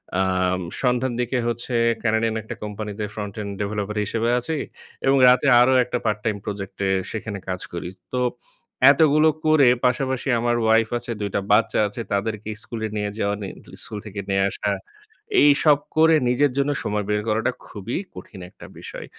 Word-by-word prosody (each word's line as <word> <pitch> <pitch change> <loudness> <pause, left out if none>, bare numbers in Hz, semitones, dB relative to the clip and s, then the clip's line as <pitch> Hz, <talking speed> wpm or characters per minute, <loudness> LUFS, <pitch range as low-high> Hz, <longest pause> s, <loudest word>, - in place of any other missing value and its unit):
অ্যাম 95 -1 +1 0.2
সন্ধ্যার 125 0 +1
দিকে 125 +1 0
হচ্ছে, 120 +1 -3 0.3
ক্যানাডিয়ান 110 0 +1
একটা - - -7
কোম্পানিতে 105 0 -5
ফ্রন্ট 105 -2 -5
এন্ড 100 -1 -5
ডেভেলপার 105 0 -3
হিসেবে 115 +3 -1
আছি। 155 +6 -3 0.5
এবং 135 +1 +4
রাতে 125 +3 +5
আরো 130 +1 +5
একটা 125 0 -3
পার্ট 105 -2 0
টাইম 110 -2 0
প্রজেক্ট 100 -2 -6
এ - - +2 0.2
সেখানে 110 -2 -5
কাজ 90 0 -3
করি। 85 0 -4 0.2
তো 125 - 0 0.7
এতগুলো 155 0 +4 0.2
করে 155 -4 +5 0.2
পাশাপাশি 130 +1 0
আমার 120 0 +1
ওয়াইফ 110 0 +3
আছে, 120 0 -6
২ 100 - -1
টা 100 - +1
বাচ্চা 105 0 +3
আছে 105 +3 -6
তাদেরকে 105 +1 -2
স্কুলে 110 -2 -4
নিয়ে 105 0 -1
যাওয়া 100 -1 0
নি 100 - -4 0.4
স্কুল 105 - -5
থেকে 100 -1 -7
নিয়ে 95 0 +2
আসা। 105 - -3 0.7
এইসব 145 0 +5 0.2
করে 160 0 +6
নিজের 135 +3 +2
জন্য 140 +1 +1
সময় 105 0 -1
বের 105 0 +1
করাটা 110 +4 +1 0.2
খুবই 105 +3 -5 0.2
কঠিন 95 +1 -11
একটা - - -14
বিষয়। - - -8
110 Hz, 170 wpm, -23 LUFS, 105-125 Hz, 0.7 s, করে